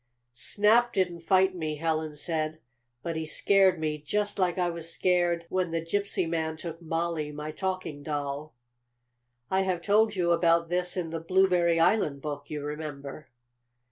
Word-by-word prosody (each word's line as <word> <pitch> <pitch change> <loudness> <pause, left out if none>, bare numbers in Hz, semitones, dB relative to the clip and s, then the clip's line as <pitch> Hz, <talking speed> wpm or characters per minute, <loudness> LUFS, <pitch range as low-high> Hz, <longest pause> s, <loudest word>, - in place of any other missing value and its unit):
"Snap 215 - +3
didn't 180 -3 0
fight 190 +2 +3
me," 155 -4 -3
Helen 155 -1 -2
said. 155 0 -2 0.4
"But 165 -1 -3
he 160 - -2
scared 190 +1 +3
me 155 -1 -2
just 205 +7 -1
like 180 -1 +1
I 180 -1 +1
was 170 0 -5
scared 175 -1 +1
when 185 -1 -1
the 165 0 -1
gypsy 190 +2 -1
man 160 -1 -2
took 165 +1 -7
Mollie, 165 -2 -2
my 150 +1 -6
talking 185 -3 -4
doll." 145 -1 -4 1.0
I 190 0 +3
have 185 -3 -1
told 215 +2 +3
you 175 -2 +1
about 170 0 +3
this 180 +1 0
in 165 -3 -2
the 165 - -3
Blueberry 175 -1 +3
Island 165 -5 +2
book, 145 -1 -5
you 150 -1 -4
remember. 150 -1 -6
165 Hz, 160 wpm, -28 LUFS, 155-185 Hz, 1.0 s, Snap